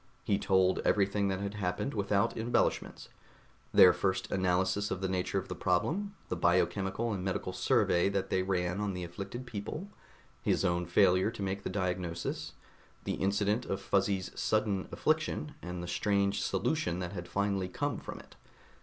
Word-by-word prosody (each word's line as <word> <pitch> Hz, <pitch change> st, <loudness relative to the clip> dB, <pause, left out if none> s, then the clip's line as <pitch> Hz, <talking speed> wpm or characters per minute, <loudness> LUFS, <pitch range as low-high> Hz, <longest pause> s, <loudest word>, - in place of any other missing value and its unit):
He 100 Hz, -1 st, +1 dB
told 95 Hz, -1 st, +3 dB
everything 100 Hz, 0 st, +2 dB
that 95 Hz, 0 st, -1 dB
had 100 Hz, 0 st, -3 dB
happened 95 Hz, +6 st, -2 dB
without 100 Hz, -1 st, +1 dB
embellishments: 115 Hz, +2 st, 0 dB, 0.6 s
their 90 Hz, -1 st, +8 dB
first 95 Hz, +1 st, -1 dB
analysis 95 Hz, +2 st, +1 dB
of 90 Hz, -, -2 dB
the 95 Hz, -, -1 dB
nature 95 Hz, +1 st, -1 dB
of 95 Hz, 0 st, -2 dB
the 90 Hz, -, -4 dB
problem, 160 Hz, -, 0 dB
the -, -, -2 dB
biochemical 100 Hz, +4 st, +1 dB
and 95 Hz, -2 st, -3 dB
medical 95 Hz, -1 st, -2 dB
survey 90 Hz, +2 st, +3 dB
that 100 Hz, -1 st, -2 dB
they 95 Hz, -, +2 dB
ran 90 Hz, 0 st, -1 dB
on 100 Hz, -2 st, -1 dB
the 90 Hz, -, -4 dB
afflicted 100 Hz, +8 st, -6 dB
people, 120 Hz, -, -5 dB, 0.5 s
his -, -, +1 dB
own 85 Hz, 0 st, +1 dB
failure 95 Hz, +2 st, +4 dB
to 115 Hz, -3 st, -6 dB
make 95 Hz, +1 st, -2 dB
the -, -, -4 dB
diagnosis, 90 Hz, -3 st, -3 dB, 0.5 s
the -, -, -2 dB
incident 100 Hz, +4 st, 0 dB
of 95 Hz, -, -2 dB
Fuzzy's 95 Hz, -1 st, 0 dB
sudden 105 Hz, -3 st, 0 dB
affliction, 155 Hz, -1 st, 0 dB
and 90 Hz, 0 st, -5 dB
the -, -, -5 dB
strange 100 Hz, +2 st, +1 dB
solution 125 Hz, -, 0 dB
that 90 Hz, +1 st, -4 dB
had 90 Hz, -2 st, -6 dB
finally 100 Hz, 0 st, 0 dB
come -, -, -2 dB
from -, -, -7 dB
it. -, -, -16 dB
95 Hz, 165 wpm, -31 LUFS, 90-100 Hz, 0.6 s, their